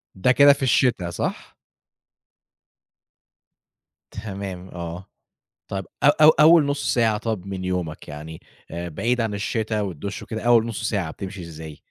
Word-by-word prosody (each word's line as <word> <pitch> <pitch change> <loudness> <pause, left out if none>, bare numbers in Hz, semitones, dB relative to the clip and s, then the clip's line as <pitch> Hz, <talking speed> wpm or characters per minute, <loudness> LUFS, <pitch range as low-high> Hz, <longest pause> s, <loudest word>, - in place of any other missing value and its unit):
ده 95 +7 +2
كده 140 +2 +7
في 140 - -6
الشتا 120 -7 +2
صح؟ 85 - -4 2.6
تمام 95 -3 -7
آه. 85 +1 -7 0.6
طَب 95 -1 -3 0.2
أ - - +6 0.2
أو 155 - +10
أول 155 0 +6
نُص 145 0 -1
ساعة 115 -3 +2
طَب 110 -4 -4
من 95 -1 -5
يومك 90 -4 -3
يعني 75 +2 -8 0.3
آآ 85 +1 -5
بعيد 120 +9 -1
عن 110 -2 -2
الشِتا 110 +1 -2
والدُش 100 +1 -5
وكده، 110 -1 -6
أول 120 -1 +4
نُص 110 -1 -3
ساعة 95 -7 -2
بتمشي 95 +1 -7
إزاي؟ 80 -3 -9
100 Hz, 140 wpm, -23 LUFS, 90-115 Hz, 2.6 s, أو